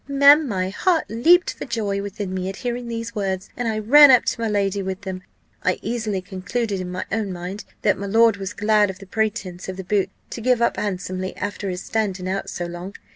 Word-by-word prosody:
Ma'am, 280 +2 +6
my 185 -4 -1
heart 330 - +1
leaped 335 +11 +4
for - - -7
joy 210 -5 -2
within 200 -1 -5
me 185 0 -2
at 195 - -6
hearing 240 0 -2
these 230 -2 -4
words, 195 -3 -3
and 245 -1 -2
I 220 -1 -1
ran 285 +7 +8
up 255 -2 +6
to - - -1
my 225 - 0
lady 200 -1 0
with 190 +1 -4
them. 190 -2 -5 0.4
I 185 - +1
easily 215 -4 -2
concluded 200 +2 -3
in 180 - -5
my 180 - -4
own 215 -2 -1
mind, 180 +3 -6 0.2
that 205 -3 +2
my 200 - -4
lord 225 +1 +4
was 195 0 -5
glad 210 -1 +3
of 190 - -6
the 195 - -12
pretence 190 -3 -3
of 185 - -5
the 190 - -5
boots, 195 0 +1 0.2
to 230 - -5
give 250 +1 +3
up 235 - +1
handsomely 185 -2 -3
after 205 0 -4
his 180 0 -4
standing 195 -5 -2
out 195 +1 -2
so 175 - -4
long. 175 +3 -7
205 Hz, 225 wpm, -22 LUFS, 190-230 Hz, 0.4 s, ran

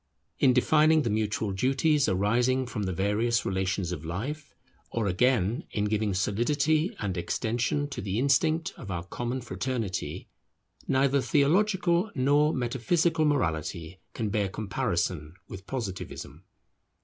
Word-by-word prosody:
In 130 - +5
defining 155 +5 +4
the 115 - -1
mutual 105 -1 -1
duties 135 +7 +2
arising 120 +7 +2
from 110 -3 -5
the 95 - -1
various 105 +6 0
relations 95 -1 -1
of 85 -4 -5
life, 135 - -5 0.3
or 115 -2 -2
again 115 - +1
in 105 - -1
giving 105 -2 0
solidity 145 - +1
and 100 -4 -3
extension 120 +10 -1
to - - -5
the 100 +1 -2
instinct 155 +5 +2
of 100 - -9
our 85 -2 -3
common 120 +7 -4
fraternity, 120 -5 -4 0.6
neither 135 +1 +2
theological 175 - +2
nor 145 +3 +3
metaphysical 155 +6 +1
morality 85 - -1 0.2
can 110 -2 -2
bear 100 -2 0
comparison 85 -5 -2
with 95 0 -10
Positivism. 110 -8 -6
120 Hz, 125 wpm, -28 LUFS, 95-140 Hz, 0.6 s, In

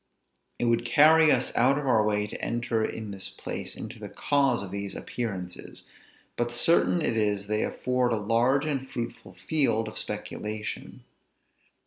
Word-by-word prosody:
It - - -1
would 115 0 +2
carry 155 +5 +6
us 125 - +1
out 130 +4 +4
of 145 - -3
our 115 -5 +4
way 105 -1 +1
to 105 - -7
enter 120 -1 0
in 110 -1 -4
this 95 -1 -6
place - - -5
into - - -8
the - - -7
cause 140 -6 +1
of 95 - -7
these 100 0 -4
appearances, 95 -7 -5 0.5
but 120 0 0
certain 170 +4 +3
it 115 - +1
is 105 -2 +1
they 105 +1 0
afford 125 -1 0
a - - +2
large 120 +7 +2
and 135 -3 -2
fruitful 115 -6 -6
field 110 +2 +1
of 110 - -4
speculation. 105 0 -5
115 Hz, 160 wpm, -27 LUFS, 105-130 Hz, 0.5 s, carry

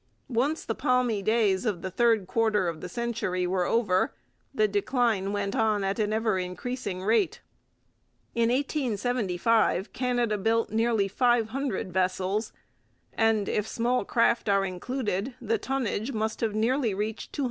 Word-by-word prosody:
Once 275 +6 0
the 225 - -1
palmy 250 -4 +1
days 215 -2 +2
of 205 -7 -2
the 185 - -3
third 225 -1 +3
quarter 210 -1 +1
of 165 -2 -4
the 180 - -6
century 220 -5 -2
were 180 0 0
over 185 - +1 0.4
the 215 0 +2
decline 205 -1 0
went 200 -1 -2
on 215 -2 +2
at 195 +2 -1
an 210 -1 +1
ever 220 -3 +1
increasing 185 +1 -4
rate. 225 - +2 0.9
In 235 -1 +2
1875 230 - 0
Canada 245 -4 0
built 225 +3 +1
nearly 225 -2 +2
500 240 -2 0
vessels, 190 +3 0 0.6
and, 225 -2 +2
if 210 0 -1
small 245 +3 0
craft 230 -2 +2
are 195 -1 +3
included, 210 +4 -3
the 225 -3 -1
tonnage 255 -3 -2
must 220 0 -2
have 220 -2 0
nearly 230 0 +1
reached 215 +2 -4
200,000. - - -7
220 Hz, 145 wpm, -27 LUFS, 195-240 Hz, 0.9 s, third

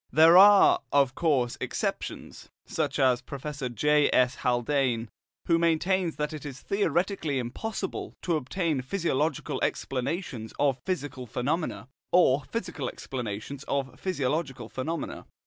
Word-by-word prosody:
There 160 +2 +7
are, 200 +1 +8
of 140 -2 +3
course, 135 -7 +1
exceptions, - - -4 0.2
such - - -2
as 130 -3 +3
Professor 140 0 -5
J. 150 +5 +3
S. 125 0 +3
Haldane,* 120 -2 0 0.4
who 165 -1 +3
maintains 170 +1 +1
that 150 +1 -3
it 155 - -7
is 140 -3 -7
theoretically 185 -6 0
impossible 190 - -4
to 170 - +1
obtain 155 0 -1
physiological 155 -1 -1
explanations 130 - -3
of 135 -3 +1
psychical 145 -8 -3
phenomena, 135 +5 -2 0.2
or 145 -6 +4
physical 155 - -4
explanations 125 +2 -6
of 135 -1 -3
physiological 140 - -2
phenomena. 160 +5 -4
145 Hz, 120 wpm, -27 LUFS, 130-170 Hz, 0.4 s, are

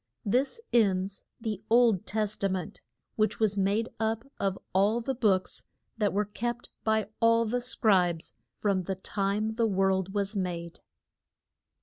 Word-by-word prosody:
This 260 - +1
ends 195 -4 +2
the 220 -4 -3
Old 230 -5 +4
Tes 215 0 0
ta 200 - 0
ment, 185 -3 -4 0.4
which 215 0 +1
was 215 -2 +2
made 200 +3 +1
up 225 +2 -1
of 195 -1 0 0.2
all 200 +5 +3
the 265 +3 -2
books 205 -7 +1 0.3
that 210 -3 +1
were 210 +2 +1
kept 240 +4 -4
by 220 -2 +1
all 230 0 +4
the 245 +3 -1
scribes 185 -9 +2 0.2
from 195 -3 0
the 190 - -2
time 200 +3 -1
the 230 -1 +3
world 190 -1 +1
was 200 +1 -1
made. 170 -3 -3
205 Hz, 145 wpm, -29 LUFS, 190-225 Hz, 0.4 s, Old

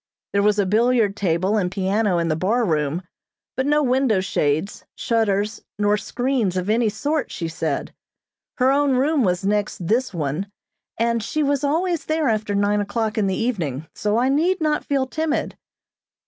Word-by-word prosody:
There 200 - +3
was 210 0 +3
a 205 - +2
billiard 220 0 +2
table 190 +2 +1
and 180 -4 0
piano 195 0 0
in 170 -1 0
the 155 - +1
bar 220 +9 +1
room; 155 0 0 0.5
but 260 +1 -1
no 295 +1 +3
window 255 -5 +2
shades, 160 -1 -1
shutters 215 -2 0 0.2
nor 205 0 +2
screens 235 -3 -1
of 185 +3 0
any 225 0 +2
sort, 290 +8 -2
she 165 - -4
said. 165 - -3 0.6
Her 255 +1 +3
own 280 0 +2
room 280 +2 +2
was 180 -1 0
next 205 -4 -1
this 245 +5 +1
one, 165 +3 -3 0.5
and 235 0 +1
she 305 +8 -1
was 285 0 0
always 335 +3 0
there 315 -3 +1
after 215 -2 -1
nine 205 +1 +2
o'clock 215 +2 -2
in 210 -3 +1
the 190 - -1
evening, 165 - -2
so 210 +1 0
I 245 +2 +2
need 330 +8 +2
not 305 -1 0
feel 275 -2 0
timid. 315 +3 -2
215 Hz, 175 wpm, -22 LUFS, 195-260 Hz, 0.6 s, There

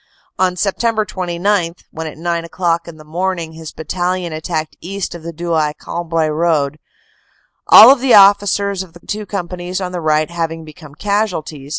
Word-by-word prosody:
On 185 -1 +2
Sept. 215 +3 0
29, 175 -1 -1 0.2
when 160 0 -5
at 155 - -9
nine 170 0 -2
o - - -8
clock 170 -2 -1
in 165 -2 -10
the 155 - -13
morning 170 +1 -3
his 160 -1 -9
battalion 175 +2 -3
attacked 155 0 -3
east 195 +2 -4
of 170 - -9
the 170 +1 -6
Douai 160 -2 -1
Cambrai 165 -2 -2
road, 155 -2 0 0.9
all 245 +6 +10
the 255 -3 +3
officers 200 -1 +4
of 185 -3 -10
the 175 - -17
two 210 0 -4
companies 180 -1 -4
on 185 -2 -4
the 180 -1 -4
right 155 0 +1
having 165 -1 -3
become 155 -2 -13
casualties. 170 -8 -2
170 Hz, 170 wpm, -17 LUFS, 160-190 Hz, 0.9 s, all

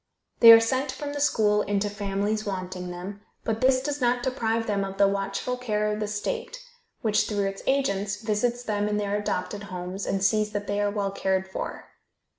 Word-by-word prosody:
They 230 - +11
are 225 - +11
sent 260 +4 0
from 285 +2 -5
the 290 - -4
school 210 -7 +3
into 205 0 0
families 205 +1 -2
wanting 185 -2 -4
them, 185 +3 -7 0.2
but 225 0 -2
this 255 0 +3
does 290 0 -3
not 245 0 +2
deprive 230 -3 0
them 200 -2 0
of 195 0 -5
the 200 0 +5
watchful 195 +5 -2
care 210 -4 -1
of 210 - -4
the 210 - -2
state, 470 - -3 0.4
which, 215 -3 +2
through 205 -2 0
its 195 0 -4
agents, 205 -7 0
visits 230 +3 -1
them 210 -2 -1
in 210 - 0
their 205 -1 -1
adopted 205 0 -3
homes, 185 +1 -5
and 195 -1 0
sees 210 +1 +2
that 205 0 -2
they 205 0 -1
are 205 - +2
well 200 -1 -2
cared 190 -1 0
for. 190 - -6
210 Hz, 200 wpm, -26 LUFS, 195-230 Hz, 0.4 s, They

